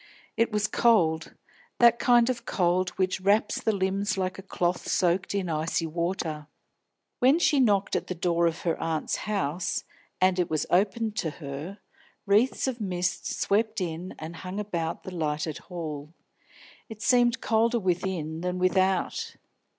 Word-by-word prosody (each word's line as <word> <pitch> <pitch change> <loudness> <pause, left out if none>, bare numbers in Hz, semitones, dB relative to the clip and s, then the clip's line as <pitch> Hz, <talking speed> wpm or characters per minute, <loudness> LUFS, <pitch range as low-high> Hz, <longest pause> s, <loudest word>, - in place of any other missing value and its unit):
It 230 0 +1
was 210 0 +1
cold, 175 -9 +2 0.4
that 235 -1 +6
kind 240 -1 +5
of 235 -2 -6
cold 180 -3 +1
which 185 0 0
wraps 200 +3 +2
the 220 - +2
limbs 195 0 -1
like 185 0 -2
a - - -6
cloth 180 -2 -2
soaked 180 +2 +1
in 195 -2 -1
icy 165 +1 -1
water. 165 -2 -3 0.7
When 265 +5 +5
she 305 -4 +3
knocked 205 -6 +2
at - - -2
the 185 - -4
door 170 0 +2
of 165 0 -3
her 165 -2 -1
aunt's 160 -2 -1
house, 185 -5 -1 0.4
and 185 0 +3
it 180 - +1
was 155 -1 0
opened 210 +4 +1
to 160 - 0
her, 150 +5 -6 0.5
wreaths 215 +7 +2
of 245 -3 -3
mist 180 -2 -2
swept 220 +2 +1
in 175 0 -4
and 160 +2 -7
hung 185 +4 -5
about 170 -6 -3
the 185 - -7
lighted 155 -2 -2
hall. 155 -3 -7 0.7
It 220 -1 -8
seemed 240 -2 +3
colder 230 +2 +2
within 175 -4 -2
than 180 0 -2
without. 185 0 +1
185 Hz, 155 wpm, -27 LUFS, 170-210 Hz, 0.7 s, that